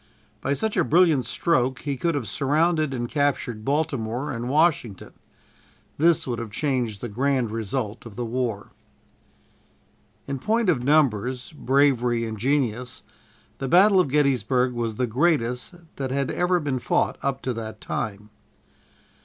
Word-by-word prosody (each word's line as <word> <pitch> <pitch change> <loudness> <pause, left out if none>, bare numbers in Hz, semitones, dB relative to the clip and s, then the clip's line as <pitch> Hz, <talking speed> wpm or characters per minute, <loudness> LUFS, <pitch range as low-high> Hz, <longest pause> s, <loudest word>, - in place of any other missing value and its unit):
By 140 - 0
such 220 +6 -1
a 180 - +4
brilliant 160 -7 +3
stroke 130 -5 0
he 140 -2 -2
could 165 +4 -1
have 130 -7 -3
surrounded 155 - +1
and 120 -2 -3
captured 140 -6 -1
Baltimore 135 -2 -1
and 120 0 -4
Washington. 145 - +1 0.9
This 165 0 +3
would 120 -2 -3
have 115 -2 -5
changed 120 -4 -2
the 120 - -3
grand 125 +1 0
result 115 +1 -4
of 105 - -12
the 120 - -3
war. 115 -3 -3 1.5
In 135 -1 -4
point 225 - +1
of 125 -8 +1
numbers, 130 -3 +1
bravery 130 -5 +2
and 110 -2 -6
genius, 125 -2 -1 0.6
the 135 - -3
battle 190 +6 +6
of 180 - +3
Gettysburg 130 -3 +1
was 115 -2 -2
the 125 - 0
greatest 125 +1 0 0.2
that 135 -1 -3
had 135 +1 -1
ever 180 0 +1
been 140 -5 -2
fought - - 0
up 135 -1 -2
to 130 0 -1
that 110 -2 -7
time. 105 -1 -5
130 Hz, 145 wpm, -24 LUFS, 115-150 Hz, 1.5 s, battle